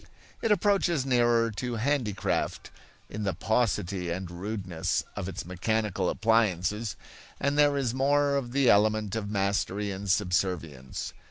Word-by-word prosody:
It 225 - +1
approaches 190 -7 +2
nearer 120 -3 +3
to 120 +3 -4
handicraft, 120 -4 -1 0.4
in 105 - -6
the 95 -4 -1
paucity 100 -3 0
and 90 +1 -4
rudeness 95 -2 -2
of 95 -2 -4
its 95 +1 -6
mechanical 95 +1 -1
appliances, 105 -1 +1 0.4
and 140 0 0
there 145 -1 +4
is 125 -4 0
more 140 +2 +2
of 130 -4 -2
the 135 0 +2
element 105 -1 +3
of 105 -2 -3
mastery 100 0 0
and 100 +1 -5
subservience. 90 -8 -1
105 Hz, 135 wpm, -28 LUFS, 95-125 Hz, 0.4 s, there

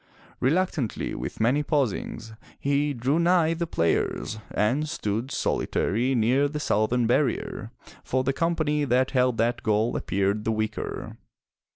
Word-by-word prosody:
Reluctantly, 150 - 0
with - - -5
many 125 +6 +3
pausings, 125 - -2 0.3
he 145 +1 +1
drew 135 +4 0
nigh 170 -1 +3
the 170 0 -3
players, 110 - 0
and 130 +9 0
stood 115 -4 -2
solitary 125 -1 0
near 125 +5 +3
the 150 +1 -4
southern 120 -2 +1
barrier, 125 +4 0 0.3
for 130 0 0
the 135 +1 0
company 155 -1 0
that 130 -1 +2
held 125 -3 +2
that 120 +1 +1
goal 110 +1 +1
appeared 100 +2 0
the 110 - 0
weaker. 110 0 -3
130 Hz, 135 wpm, -26 LUFS, 110-150 Hz, 0.3 s, many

